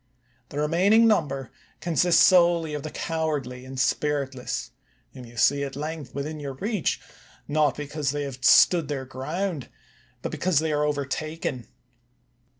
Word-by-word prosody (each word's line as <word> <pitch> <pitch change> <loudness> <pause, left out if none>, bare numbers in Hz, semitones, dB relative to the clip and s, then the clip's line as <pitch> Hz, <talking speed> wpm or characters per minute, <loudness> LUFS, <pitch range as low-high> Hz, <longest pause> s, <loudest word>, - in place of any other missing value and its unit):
The 145 - -8
remaining 185 +9 +4
number 140 - 0 0.3
consists 170 0 +3
solely 170 -4 +4
of 150 - -3
the 155 - -5
cowardly 150 -7 -3
and 130 0 -7
spiritless, 135 - -1 0.4
whom 130 -2 -10
you 120 0 -14
see 140 +5 +3
at 135 -1 -5
length 150 -2 -6
within 150 +2 -4
your 140 -2 -5
reach, 200 - -1 0.5
not 150 -3 +2
because 145 0 -3
they 145 +1 -2
have 130 -2 -7
stood 165 +5 +6
their 135 -2 -3
ground, 150 +3 -4 0.5
but - - -3
because 180 -3 0
they 160 +1 +2
are 150 0 +1
overtaken. 145 -2 -3
150 Hz, 145 wpm, -25 LUFS, 135-160 Hz, 0.5 s, stood